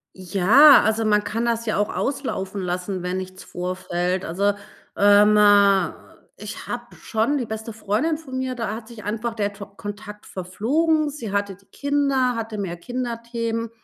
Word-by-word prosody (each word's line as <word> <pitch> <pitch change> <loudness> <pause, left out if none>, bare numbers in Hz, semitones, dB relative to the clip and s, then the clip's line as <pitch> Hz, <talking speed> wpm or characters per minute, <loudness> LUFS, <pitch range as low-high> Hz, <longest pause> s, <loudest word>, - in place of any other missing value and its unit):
Ja, 200 - +6
also, 220 +1 +1
man 210 -1 +3
kann 230 +3 -2
das 230 -1 -1
ja 215 - 0
auch 205 +1 0
auslaufen 210 -9 -3
lassen, 180 +1 -3
wenn 180 +1 -2
nichts 185 0 -7
vorfällt. 180 0 -3
Also, 200 +5 +1 0.4
ähm, 205 +1 +6 1.0
ich 210 +1 -8
habe 240 0 -6
schon 230 +7 -1
die 250 - -2
beste 220 +1 -6
Freundin 220 +9 -1
von 265 -5 -7
mir, 260 -1 -2
da 225 -3 -3
hat 220 0 -9
sich 230 -3 -11
einfach 225 +2 -3
der 205 -2 -1
To 200 0 -9
Kontakt 205 +1 -9
verflogen. 295 - 0
Sie 245 -8 -6
hatte 200 -1 -1
die 200 +2 -26
Kinder, 275 -1 0
hatte 225 -1 -4
mehr 185 -4 -4
Kinderthemen, 230 0 -4
215 Hz, 160 wpm, -23 LUFS, 200-240 Hz, 1.0 s, Ja